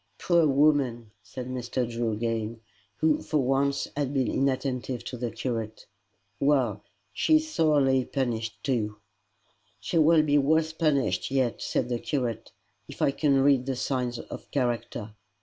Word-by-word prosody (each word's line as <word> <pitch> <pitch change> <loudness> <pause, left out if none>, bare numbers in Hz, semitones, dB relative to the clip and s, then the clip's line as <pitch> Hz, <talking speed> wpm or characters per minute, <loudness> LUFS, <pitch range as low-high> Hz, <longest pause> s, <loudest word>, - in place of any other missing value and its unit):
"Poor 170 -3 +3
woman!" 135 -6 +2
said 125 +6 -8
Mr. 125 -1 -2
Drew 115 -1 -2
again, 115 0 -2 0.4
who 155 -1 +2
for 155 - -1
once 135 +1 +1
had 140 -2 -1
been 130 -2 +2
inattentive 130 -2 -1
to - - -6
the 120 -1 -3
curate. 110 -2 -4 0.5
"Well! 130 -8 +2 0.3
she 315 - +3
is 310 0 +2
sorely 135 -5 +3
punished 115 -5 -3
too." 110 -6 -1 0.8
"She 100 +12 0
will 160 0 +5
be 145 -1 +3
worse 160 +3 +2
punished 155 -4 +1
yet," 130 -3 0
said 125 - -1
the 120 -1 -2
curate, 120 -6 -3 0.4
"if - - -11
I - - +3
can 140 -1 +2
read 135 -2 +3
the 135 - -1
signs 125 -1 -2
of - - -9
character. 120 -4 -2
130 Hz, 150 wpm, -27 LUFS, 120-145 Hz, 0.8 s, will